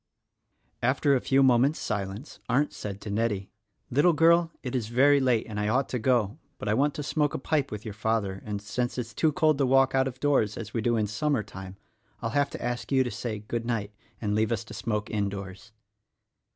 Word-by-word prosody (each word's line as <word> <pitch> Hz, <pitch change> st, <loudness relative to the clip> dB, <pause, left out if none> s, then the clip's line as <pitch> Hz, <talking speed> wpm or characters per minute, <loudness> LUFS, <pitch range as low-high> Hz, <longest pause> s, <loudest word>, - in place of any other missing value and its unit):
After 135 Hz, +4 st, +2 dB
a 130 Hz, -, +1 dB
few 135 Hz, 0 st, +3 dB
moments 130 Hz, +4 st, +4 dB
silence 100 Hz, +5 st, -4 dB
Arndt 140 Hz, +4 st, +2 dB
said 100 Hz, -1 st, -6 dB
to 105 Hz, -, -6 dB
Nettie, 105 Hz, -2 st, -1 dB, 0.4 s
"Little 145 Hz, +7 st, +4 dB
girl, 165 Hz, +2 st, +4 dB
it 125 Hz, -, -4 dB
is 120 Hz, -4 st, -1 dB
very 140 Hz, +5 st, +4 dB
late, 125 Hz, -4 st, +2 dB
and 105 Hz, -2 st, -5 dB
I 105 Hz, -, 0 dB
ought 130 Hz, +5 st, +1 dB
to 125 Hz, -, -2 dB
go; 120 Hz, +1 st, +1 dB, 0.2 s
but -, -, -6 dB
I 105 Hz, -, +2 dB
want 145 Hz, +5 st, +2 dB
to 150 Hz, -, -4 dB
smoke 150 Hz, 0 st, 0 dB
a -, -, 0 dB
pipe 145 Hz, +1 st, 0 dB
with 105 Hz, 0 st, -7 dB
your 110 Hz, -, -5 dB
father, 100 Hz, -3 st, -1 dB
and, 100 Hz, -1 st, -5 dB
since 120 Hz, +4 st, -2 dB
it -, -, +1 dB
is 115 Hz, -2 st, -9 dB
too 155 Hz, +7 st, +2 dB
cold 155 Hz, -1 st, +2 dB
to 140 Hz, -, +3 dB
walk 135 Hz, 0 st, +4 dB
out 135 Hz, 0 st, +3 dB
of 130 Hz, -1 st, -7 dB
doors 135 Hz, -8 st, +2 dB
as 110 Hz, -1 st, -7 dB
we 115 Hz, -, -1 dB
do 120 Hz, +1 st, +1 dB
in 110 Hz, -, +1 dB
summer 120 Hz, +4 st, 0 dB
time, 95 Hz, -1 st, -9 dB, 0.4 s
I'll 115 Hz, -2 st, -3 dB
have 145 Hz, +3 st, +2 dB
to -, -, -6 dB
ask 120 Hz, +2 st, -3 dB
you 135 Hz, -1 st, +4 dB
to 125 Hz, -, -4 dB
say 110 Hz, -4 st, -4 dB
good 115 Hz, 0 st, -2 dB
night 110 Hz, -4 st, -2 dB, 0.3 s
and 105 Hz, -2 st, -1 dB
leave 110 Hz, +1 st, +1 dB
us 115 Hz, -1 st, -1 dB
to 110 Hz, -, -11 dB
smoke 105 Hz, -2 st, -3 dB
indoors." 100 Hz, 0 st, -4 dB
120 Hz, 225 wpm, -27 LUFS, 105-135 Hz, 0.4 s, moments